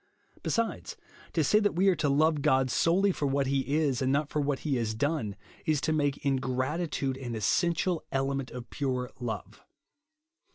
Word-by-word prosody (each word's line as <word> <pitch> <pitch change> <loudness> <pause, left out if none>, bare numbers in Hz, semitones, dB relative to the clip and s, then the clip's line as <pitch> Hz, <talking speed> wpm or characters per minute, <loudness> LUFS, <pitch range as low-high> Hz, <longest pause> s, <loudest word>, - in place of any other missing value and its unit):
Besides, 230 -1 -2 0.4
to - - +2
say 210 - +4
that 205 -4 +1
we 190 +3 +3
are 190 - +5
to 145 - +1
lovo 155 +2 +3
God 130 -3 +3
solely 190 +4 +3
for 145 -5 -1
what 140 0 +1
he 140 +1 0
is, 140 -5 +1
and 130 0 +2
not 145 +1 +1
for 150 - 0
what 140 -1 -1
he 145 -4 0
has 110 -2 -1
done, 135 -5 -1 0.3
is 155 -3 +1
to 160 - +1
make 145 -1 0
ingratitude 135 +2 -1
an 120 -3 -5
essential 170 - +1
element 135 -1 -1
of 125 -1 -9
pure 130 -3 -2
love. 120 -3 -5
140 Hz, 175 wpm, -29 LUFS, 130-160 Hz, 0.4 s, are